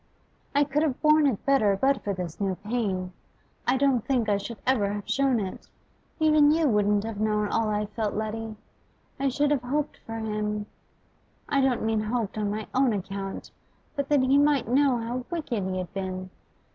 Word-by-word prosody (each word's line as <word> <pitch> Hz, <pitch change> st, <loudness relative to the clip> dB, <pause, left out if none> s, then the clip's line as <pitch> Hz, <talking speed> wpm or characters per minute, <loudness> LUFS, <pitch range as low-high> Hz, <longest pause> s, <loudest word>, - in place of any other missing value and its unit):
'I 285 Hz, -, +5 dB
could 290 Hz, +1 st, 0 dB
have 295 Hz, -5 st, 0 dB
borne 305 Hz, -1 st, +5 dB
it 240 Hz, -8 st, -2 dB
better 215 Hz, -8 st, +3 dB
but 270 Hz, +2 st, +2 dB
for 205 Hz, -, -1 dB
this 180 Hz, -2 st, -5 dB
new 195 Hz, -2 st, 0 dB
pain. 200 Hz, -3 st, -2 dB, 0.5 s
I 255 Hz, +2 st, +3 dB
don't 265 Hz, -4 st, +2 dB
think 250 Hz, -5 st, 0 dB
I 205 Hz, -, +3 dB
should 220 Hz, +3 st, -6 dB
ever 230 Hz, -6 st, +2 dB
have 205 Hz, -1 st, -5 dB
shown 260 Hz, +1 st, +2 dB
it; 190 Hz, -3 st, -5 dB, 0.5 s
even 305 Hz, -2 st, +5 dB
you 315 Hz, 0 st, +3 dB
wouldn't 210 Hz, -3 st, +2 dB
have 225 Hz, -2 st, -5 dB
known 210 Hz, -1 st, +1 dB
all 225 Hz, -1 st, +1 dB
I 210 Hz, 0 st, 0 dB
felt, 210 Hz, 0 st, -3 dB
Letty. 220 Hz, +1 st, -3 dB, 0.6 s
I 275 Hz, 0 st, +2 dB
should 290 Hz, +3 st, +1 dB
have 285 Hz, -4 st, +2 dB
hoped 285 Hz, +4 st, -2 dB
for 225 Hz, -, -8 dB
him 210 Hz, -1 st, -2 dB, 0.8 s
I 280 Hz, -1 st, +2 dB
don't 265 Hz, -4 st, +1 dB
mean 220 Hz, -1 st, +1 dB
hoped 215 Hz, -1 st, -2 dB
on 210 Hz, -1 st, 0 dB
my 215 Hz, +1 st, -3 dB
own 260 Hz, -3 st, +3 dB
account, 195 Hz, 0 st, -5 dB, 0.4 s
but 280 Hz, -2 st, -2 dB
that 290 Hz, -2 st, +4 dB
he 270 Hz, +2 st, +4 dB
might 290 Hz, -2 st, +3 dB
know 265 Hz, +1 st, +3 dB
how 240 Hz, +2 st, -3 dB
wicked 280 Hz, -, -2 dB
he 185 Hz, 0 st, -2 dB
had 185 Hz, +1 st, -5 dB
been. 185 Hz, -1 st, -4 dB
225 Hz, 190 wpm, -26 LUFS, 205-275 Hz, 0.8 s, I